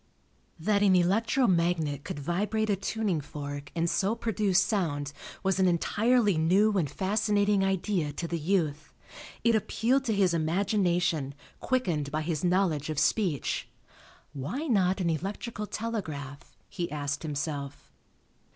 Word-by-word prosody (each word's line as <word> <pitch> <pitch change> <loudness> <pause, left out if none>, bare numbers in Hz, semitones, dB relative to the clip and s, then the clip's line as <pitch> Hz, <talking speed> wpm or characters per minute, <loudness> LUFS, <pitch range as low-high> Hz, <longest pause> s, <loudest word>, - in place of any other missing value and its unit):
That 200 +4 +1
an 195 -2 +5
electro 220 +9 +2
magnet 170 - +1
could - - -5
vibrate 205 +8 -1
a - - +3
tuning 195 -4 -1
fork 145 -1 -7
and 170 0 +1
so 200 +5 +1
produce 215 -5 +1
sound 155 -9 -1 0.3
was 190 0 +1
an 190 - +4
entirely 210 +2 +2
new 195 +6 +3
and 165 -7 +1
fascinating 205 +3 +1
idea 190 -4 0
to 170 - -4
the 170 0 -2
youth. 155 -3 -1 0.5
It 235 - +4
appealed 235 +4 +1
to 225 -4 +1
his 190 -3 +3
imagination, 170 -4 +1 0.2
quickened 175 - 0
by 155 +1 -1
his 160 -1 -2
knowledge 175 -5 +1
of 155 - -3
speech. 170 - 0 0.7
"Why 155 - -4
not 195 - +2
an 170 -2 +1
electrical 205 - -4
telegraph?" 155 - -5
he 175 -2 -4
asked 145 -1 -3
himself. 145 -2 -5
180 Hz, 135 wpm, -28 LUFS, 155-210 Hz, 0.7 s, an